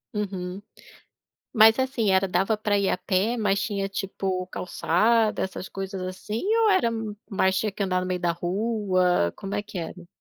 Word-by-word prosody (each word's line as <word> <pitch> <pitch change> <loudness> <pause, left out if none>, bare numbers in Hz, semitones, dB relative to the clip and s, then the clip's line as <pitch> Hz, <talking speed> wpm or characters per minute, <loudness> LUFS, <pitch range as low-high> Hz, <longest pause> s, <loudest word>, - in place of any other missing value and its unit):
Uhum. 190 -2 -4 0.9
Mas 220 +2 +7
assim 260 -6 +1
era 190 +1 +3
dava 190 +4 +1
para 210 -1 0
ir 200 -1 +1
a - - 0
pé 195 +6 0
mas 200 -3 +1
tinha 195 -2 -2
tipo 190 -1 -3
calçada, 215 +6 +1
essas 190 0 -5
coisas 195 -1 -5
assim 185 +4 -4 0.2
ou 430 - +5
era 305 -12 +3 0.4
mais 190 -1 +2
tinha 215 - 0
que 200 - -4
andar 185 -1 0
no 185 - -3
meio 180 -1 -1
da 170 -1 +1
rua, 185 - +1
como 195 0 -5
é 205 - -1
que 205 -3 -8
era? 175 +1 -7
195 Hz, 175 wpm, -25 LUFS, 185-210 Hz, 0.9 s, Mas